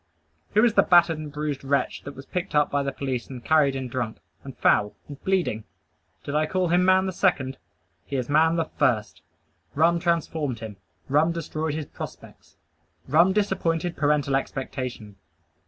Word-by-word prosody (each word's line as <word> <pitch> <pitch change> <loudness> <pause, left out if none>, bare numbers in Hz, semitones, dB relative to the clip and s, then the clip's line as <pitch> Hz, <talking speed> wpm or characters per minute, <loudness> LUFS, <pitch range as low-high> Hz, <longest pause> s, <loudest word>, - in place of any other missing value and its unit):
Who 215 +3 +6
is 235 - +3
the - - +6
battered 170 -3 +4
and 150 -1 -7
bruised 150 -2 -3
wretch 135 -1 0
that 140 - -7
was 135 +1 -10
picked 180 -2 -4
up 150 -1 +3
by 145 - +1
the 140 0 -2
police 130 -3 -4
and 125 -3 -9
carried 150 -4 +3
in 130 -1 -3
drunk, 120 -2 -3 0.3
and 135 -2 -10
foul, 105 0 +2
and 145 -1 -11
bleeding? 180 - 0 0.6
Did 140 - -5
I 155 +1 +2
call 185 0 0
him 175 +2 +3
man 190 +1 +4
the 190 - -1
second? 145 -8 0 0.5
He 140 - -4
is 125 -2 -1
man 160 +3 +3
the 165 -1 0
first! 115 - -1 0.5
Rum 170 +3 +3
transformed 160 -6 -1
him. 110 -3 -8 0.3
Rum 150 +4 +3
destroyed 160 -2 -3
his 155 -1 -3
prospects. - - -11 0.5
Rum 170 +7 +5
disappointed 175 -4 0
parental 145 -2 +1
expectation. 130 -6 -4
150 Hz, 170 wpm, -25 LUFS, 135-170 Hz, 0.6 s, Who